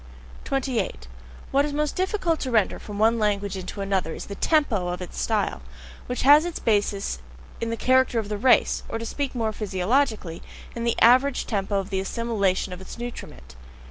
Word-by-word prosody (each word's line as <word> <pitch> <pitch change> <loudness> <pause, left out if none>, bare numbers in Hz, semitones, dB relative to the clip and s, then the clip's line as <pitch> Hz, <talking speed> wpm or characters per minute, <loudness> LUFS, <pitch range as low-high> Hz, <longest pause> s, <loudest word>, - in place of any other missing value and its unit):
28. 245 - -2 0.4
What 280 +1 +4
is 290 0 -3
most 300 0 -1
difficult 370 -4 0
to 260 - -3
render 220 -5 +2
from 205 -1 -8
one 225 +2 +3
language 205 -2 0
into 190 +2 -6
another 190 -4 -1
is - - -7
the 200 - -7
TEMPO 225 - +1
of 175 0 -3
its 180 - -6
style, 60 - 0 0.5
which 250 - -3
has 290 +3 +8
its 345 -1 -4
basis 205 - 0 0.4
in 230 - -2
the 230 - -2
character 260 -1 +3
of 220 -2 -1
the 210 0 -3
race, 255 +3 +4
or - - -2
to 230 - -5
speak 275 +3 -3
more 220 -2 -1
physiologically, 210 -2 0 0.3
in 235 0 -3
the 235 - 0
average 255 +3 +5
TEMPO 200 -2 -2
of 195 +1 -6
the 190 - 0
assimilation 200 -3 -1
of 180 - -9
its 190 - -9
nutriment. 65 - -8
220 Hz, 185 wpm, -25 LUFS, 195-260 Hz, 0.5 s, has